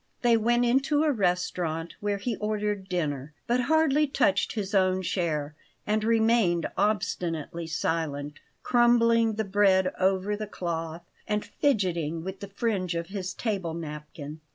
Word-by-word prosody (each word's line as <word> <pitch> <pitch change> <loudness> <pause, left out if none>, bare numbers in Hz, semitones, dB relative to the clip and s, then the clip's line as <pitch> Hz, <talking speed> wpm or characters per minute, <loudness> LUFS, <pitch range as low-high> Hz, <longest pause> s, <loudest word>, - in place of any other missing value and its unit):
They 240 -1 +5
went 240 +2 +2
into 275 +5 +2
a 310 - +3
restaurant, 180 - -1
where 205 -1 -1
he 225 +3 -2
ordered 210 -2 -2
dinner, 150 -5 -2
but 240 +1 +1
hardly 305 +2 +3
touched 245 -8 +1
his 205 -2 -4
own 185 -1 +2
share, 155 -5 -1 0.3
and 215 +1 0
remained 220 -6 +3
obstinately 170 -5 -1
silent, 150 -3 -2 0.2
crumbling 230 -2 +4
the 220 - 0
bread 190 -2 +3
over 190 +2 +1
the 215 0 -5
cloth, 165 -3 -4 0.2
and 210 0 -1
fidgeting 170 - 0
with 190 +1 -6
the 200 - -7
fringe 195 -4 -1
of 170 0 -3
his 185 -2 -4
table 190 -8 -2
napkin. 150 -1 -7
195 Hz, 140 wpm, -27 LUFS, 170-225 Hz, 0.3 s, They